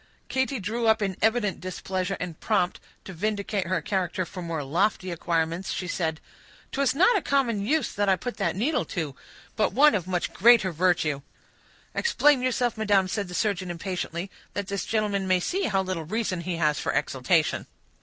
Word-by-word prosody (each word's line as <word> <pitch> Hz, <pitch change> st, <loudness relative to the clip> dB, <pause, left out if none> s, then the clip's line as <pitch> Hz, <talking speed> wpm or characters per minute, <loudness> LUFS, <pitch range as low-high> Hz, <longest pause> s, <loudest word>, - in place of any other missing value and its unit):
Katy 260 Hz, -1 st, 0 dB
drew 225 Hz, +4 st, -1 dB
up 220 Hz, -1 st, +4 dB
in 195 Hz, -2 st, -1 dB
evident 220 Hz, -2 st, +2 dB
displeasure, 185 Hz, 0 st, -3 dB
and 175 Hz, -3 st, -5 dB
prompt 195 Hz, -5 st, +1 dB, 0.3 s
to 190 Hz, -, -7 dB
vindicate 200 Hz, 0 st, -2 dB
her 170 Hz, -3 st, 0 dB
character 185 Hz, -1 st, -1 dB
for 180 Hz, +2 st, -8 dB
more 165 Hz, -3 st, -3 dB
lofty 185 Hz, +5 st, 0 dB
acquirements, 170 Hz, +1 st, -1 dB
she 180 Hz, -, -3 dB
said,— 160 Hz, -2 st, -1 dB, 0.5 s
"'Twas 275 Hz, -1 st, +1 dB
not 380 Hz, +10 st, +5 dB
a 400 Hz, -, +2 dB
common 245 Hz, -9 st, +1 dB
use 305 Hz, +8 st, 0 dB
that 205 Hz, 0 st, +1 dB
I 190 Hz, -, +5 dB
put 245 Hz, +6 st, -6 dB
that -, -, 0 dB
needle 265 Hz, +11 st, +1 dB
to—but 160 Hz, -, -4 dB
one 295 Hz, +3 st, +6 dB
of 185 Hz, -3 st, -1 dB
much 180 Hz, -2 st, -1 dB
greater 220 Hz, -3 st, +5 dB
virtue." 165 Hz, -4 st, +1 dB, 0.7 s
"Explain 295 Hz, -, +3 dB
yourself, 250 Hz, -2 st, 0 dB
madam," 205 Hz, -3 st, +3 dB
said 200 Hz, 0 st, -2 dB
the 180 Hz, -, -7 dB
surgeon 190 Hz, -4 st, 0 dB
impatiently, 175 Hz, +1 st, -4 dB, 0.2 s
"that 200 Hz, -, -2 dB
this 200 Hz, -1 st, -2 dB
gentleman 205 Hz, -3 st, 0 dB
may 185 Hz, -1 st, +3 dB
see 375 Hz, -, -1 dB
how 195 Hz, -4 st, +1 dB
little 185 Hz, -4 st, -3 dB
reason 195 Hz, -1 st, -2 dB
he 175 Hz, 0 st, -3 dB
has 150 Hz, -3 st, +1 dB
for -, -, -1 dB
exultation." 150 Hz, +5 st, +1 dB
190 Hz, 175 wpm, -26 LUFS, 175-220 Hz, 0.7 s, one